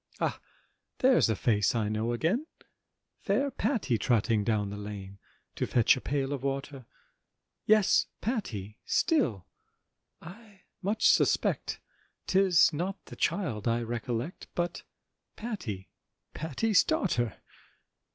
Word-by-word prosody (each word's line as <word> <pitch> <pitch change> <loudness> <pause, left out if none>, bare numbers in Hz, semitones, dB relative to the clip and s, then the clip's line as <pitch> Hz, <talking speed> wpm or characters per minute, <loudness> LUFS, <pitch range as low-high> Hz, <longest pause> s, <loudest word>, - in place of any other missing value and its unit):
Ah! - - -1 0.6
there's 255 - +4
a 110 - +2
face 105 +1 +2
I 110 -3 +1
know 110 +2 -1
again, 180 - 0 0.7
Fair 280 0 0
Patty 215 - 0
trotting 115 -2 +2
down 105 -2 0
the - - -5
Lane 100 -1 -8 0.4
To - - -1
fetch 120 -3 +4
a 130 - -6
pail 140 0 -1
of 140 - -4
water; 135 -2 -4 0.8
Yes, 215 -2 +4
Patty! 110 - -4
still 125 - +1 0.7
I 200 +3 -13 0.2
much 205 +4 +2
suspect, - - +2 0.5
'Tis 185 -4 +4
not 185 +6 -2
the - - -10
child 125 - -1
I 120 +1 +1
recollect, 120 +6 -4
But 175 0 -2 0.5
Patty, 130 - -5 0.4
Patty's 175 - +2
daughter! 120 - 0
135 Hz, 115 wpm, -29 LUFS, -, 0.8 s, there's